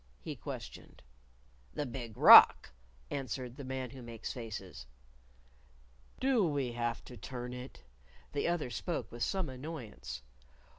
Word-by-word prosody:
he - - -6
questioned. - - -9 0.7
"The 145 - -1
Big 120 -3 -7
Rock," - - +9 0.4
answered 130 -2 -4
the 140 - -8
Man 130 -2 -4
Who 130 -1 -10
Makes 115 -2 -6
Faces. 100 - -7 1.3
"Do 260 -5 +3
we 140 -7 0
have 120 -1 -3
to 125 - -10
turn 125 +2 -6
it?" 125 - -9 0.5
The 145 - 0
other 170 -7 -1
spoke 130 - -3
with 120 - -9
some 190 +2 0
annoyance. 125 - -7
125 Hz, 130 wpm, -33 LUFS, 115-140 Hz, 1.3 s, Rock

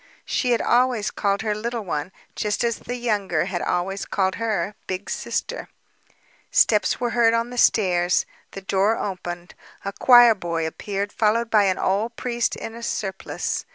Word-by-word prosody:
She 250 - 0
had 235 -2 +2
always 245 -3 +2
called 200 0 -1
her, 215 -1 0
"Little 230 +2 -3
One," 155 0 -3 0.2
just 210 +3 -1
as 235 -1 0
the 245 - -5
younger 205 -9 0
had 180 -2 -3
always 195 +3 -1
called 190 -1 0
her 210 -3 -1
"Big 185 +2 -4
Sister." - - -3 0.8
Steps 210 -2 +3
were 240 -1 -1
heard 230 -1 +4
on 230 +1 -1
the 245 - -7
stairs. 180 -6 +3 0.3
The 195 - -7
door 195 +3 +1
opened. 175 -3 -5 0.3
A 200 - -3
choir 240 -1 +7
boy 170 -5 -3
appeared, 200 +5 -4
followed 225 +1 +1
by 210 -2 +5
an 185 -1 +1
old 215 +5 0
priest 240 -1 -1
in 225 - -7
a 235 - -9
surplice. 195 -4 -3
210 Hz, 165 wpm, -23 LUFS, 190-235 Hz, 0.8 s, choir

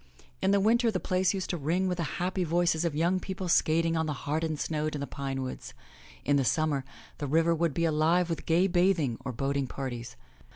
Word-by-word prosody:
In 190 - +2
the 200 0 +4
winter 230 +4 +3
the 195 -4 -1
place 185 0 +1
used 190 - -3
to 175 - -2
ring 170 +6 0
with 180 -1 -2
the - - +1
happy 185 +1 -1
voices 170 0 +1
of 165 -4 -1
young 175 +4 +2
people 190 0 -5
skating 165 0 +2
on 160 -1 0
the 150 - -1
hardened 155 +1 -1
snow 155 0 -1
in 150 -1 -3
the 140 - -2
pine 135 -1 -4
woods. 130 - -7 0.5
In 145 0 +3
the 135 - +2
summer 150 0 +1 0.4
the 145 - -3
river 165 +4 +3
would 165 -3 0
be 170 - +1
alive 165 +3 +2
with 165 -2 -4
gay 170 +3 +4
bathing 175 -9 +2
or 130 - -3
boating 135 +2 -1
parties. 125 -2 -6
165 Hz, 215 wpm, -29 LUFS, 145-180 Hz, 0.5 s, the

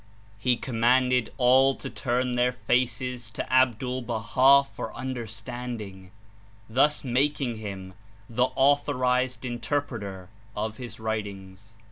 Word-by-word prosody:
He 125 +3 +2
commanded 125 +1 +2
all 130 +2 +5
to - - -7
turn 125 0 -1
their 125 +1 +2
faces 125 -1 -1
to - - -4
Abdul 130 0 +2
Baha 125 +4 +4
for - - -6
understanding, 115 -5 -6 0.6
thus 135 +7 +2
making 130 -1 0
him 95 -3 -7 0.3
the 125 +1 +1
authorized 130 -2 +2
Interpreter 120 -7 -3 0.3
of 110 +1 -3
his 120 -3 -8
writings. 100 -2 -5
125 Hz, 105 wpm, -26 LUFS, 110-130 Hz, 0.6 s, all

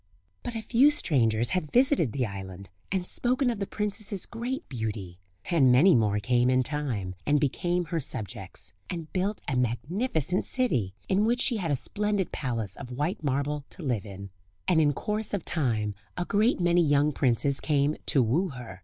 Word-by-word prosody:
But 235 - -6
a 225 - -3
few 250 +6 +5
strangers 120 - +2
had 180 -5 -1
visited 250 - +3
the 130 0 -1
island, 95 -2 -8 0.2
and 185 -2 -1
spoken 250 +5 +1
of 225 - -5
the 200 - -2
princess's 210 -2 -2
great 240 +3 -5
beauty; 105 -7 -5 0.3
and 140 -7 +5
many 160 +10 +6
more 105 -4 +2
came 120 +4 +2
in 130 0 +3
time, 125 -10 -3
and 145 0 +2
became 175 +5 0
her 165 +1 -2
subjects, 100 -9 -6 0.2
and 165 -3 -6
built 195 +2 -1
a 145 - -1
magnificent 155 - -1
city, 125 - 0
in 195 +2 +2
which 240 +3 +2
she 245 -2 +3
had 180 -5 -2
a 145 - +2
splendid 200 +8 -1
palace 115 -8 -3
of 125 -3 -8
white 160 +4 -2
marble 145 +1 -1
to 180 - -9
live 115 -7 -1
in. 100 0 -9 0.4
And 170 -3 +4
in 145 -2 +4
course 210 +7 -2
of 190 - -5
time 110 -9 0 0.2
a 175 - -1
great 215 +5 +2
many 175 0 +3
young 145 0 +3
princes 135 +1 +1
came 145 -1 +1
to 135 - +6
woo 160 - +1
her. 120 - -9
150 Hz, 180 wpm, -27 LUFS, 120-195 Hz, 0.4 s, many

